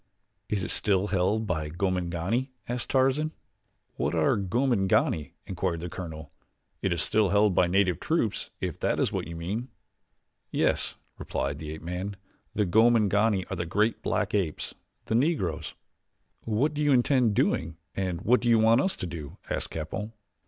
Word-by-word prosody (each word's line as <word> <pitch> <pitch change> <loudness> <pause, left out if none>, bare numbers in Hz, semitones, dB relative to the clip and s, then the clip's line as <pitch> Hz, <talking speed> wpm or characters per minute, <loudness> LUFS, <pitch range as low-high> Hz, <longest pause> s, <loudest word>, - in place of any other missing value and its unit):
"Is 100 -3 0
it - - -1
still 100 0 +2
held 100 +3 +1
by 80 -6 -2
Gomangani?" 90 - -1 0.2
asked 120 0 -3
Tarzan. 135 +4 +2 0.6
"What - - 0
are - - +3
Gomangani?" 100 - +1
inquired 95 -3 -2
the 85 - -4
colonel. 80 -4 -7 0.5
"It 95 - 0
is 85 -3 +4
still 105 -2 +3
held 100 0 +4
by 90 - +4
native 90 -2 +2
troops, - - 0
if - - -4
that - - 0
is - - +1
what - - -3
you 85 - -7
mean." 100 +9 -3 0.8
"Yes," - - +1 0.2
replied 70 +1 -3
the 75 - -6
ape 80 +1 -7
man, 90 +4 -4 0.4
"the 105 - +2
Gomangani 105 -1 +3
are - - -1
the 85 -1 -3
great 105 +6 +1
black - - -1
apes 95 -7 -1 0.3
the - - -2
Negroes." 105 - 0 0.7
"What 120 +8 +1
do 150 - -2
you 145 - +3
intend 125 -3 +3
doing 80 -3 +1 0.2
and 90 -2 -2
what 120 +4 +3
do 120 - +1
you 115 - +6
want 115 +3 +5
us 190 - +1
to - - -5
do?" 85 -5 -7
asked - - -2
Capell. 80 +8 -5
100 Hz, 165 wpm, -27 LUFS, 85-115 Hz, 0.8 s, you